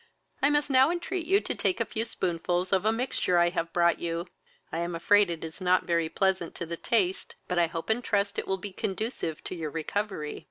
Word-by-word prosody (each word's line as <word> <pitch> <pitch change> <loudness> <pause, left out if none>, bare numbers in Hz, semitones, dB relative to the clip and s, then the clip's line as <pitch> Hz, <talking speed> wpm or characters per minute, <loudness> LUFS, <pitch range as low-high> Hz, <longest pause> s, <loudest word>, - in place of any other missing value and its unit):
I 280 - +5
must 295 -1 +1
now 265 +2 +6
entreat 350 0 -2
you 395 +2 +4
to - - -3
take 365 - 0
a - - +1
few 225 0 -2
spoonfuls 175 -1 -1
of 190 +1 +2
a 220 - +4
mixture 225 -6 0
I 175 0 +5
have 170 -1 -2
brought 170 0 +3
you. 170 0 -2 0.5
I 165 - -2
am 170 0 -2
afraid 205 +3 +4
it 165 -1 -4
is 160 +3 -7
not 185 0 +3
very 170 -2 +1
pleasant 190 -1 0
to 170 - -4
the 170 +1 -4
taste, 190 0 0
but 180 -1 0
I 170 - +4
hope 165 0 -5
and 240 +3 0
trust 200 -1 0
it - - -5
will 190 - 0
be 200 0 -6
conducive 190 -5 -3
to - - -5
your 165 -4 -4
recovery." 165 0 -3
185 Hz, 230 wpm, -28 LUFS, 170-220 Hz, 0.5 s, now